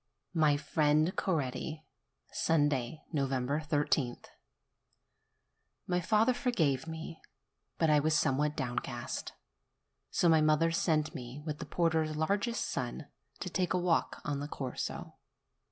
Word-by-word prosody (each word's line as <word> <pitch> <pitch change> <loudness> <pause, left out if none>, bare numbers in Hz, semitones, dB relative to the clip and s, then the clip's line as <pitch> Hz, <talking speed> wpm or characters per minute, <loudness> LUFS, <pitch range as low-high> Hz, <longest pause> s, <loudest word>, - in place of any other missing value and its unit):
MY 155 -4 +4
FRIEND 155 +3 +2
CORETTI 155 -1 -2 0.5
Sunday, 145 -3 +1
I3th. 140 -1 0 1.6
My 180 -1 +1
father 220 +6 +3
forgave 160 - +1
me; 160 0 -7 0.6
but 160 -2 +3
I 150 - +6
was 155 +2 +2
somewhat 150 +1 +1
down 125 -4 -1
cast. 120 -2 -5 0.8
So 175 - +2
my 160 -2 +6
mother 155 +2 +3
sent 155 -2 +1
me, 125 +3 -7
with 150 -2 -4
the - - -6
porter's 160 -2 +1
largest 200 +9 0
son, - - -4 0.3
to - - -3
take 185 -1 0
a - - +2
walk 175 -2 +1
on 145 -1 -1
the 145 - -4
Corso. 130 -4 -5
155 Hz, 120 wpm, -32 LUFS, 145-165 Hz, 1.6 s, I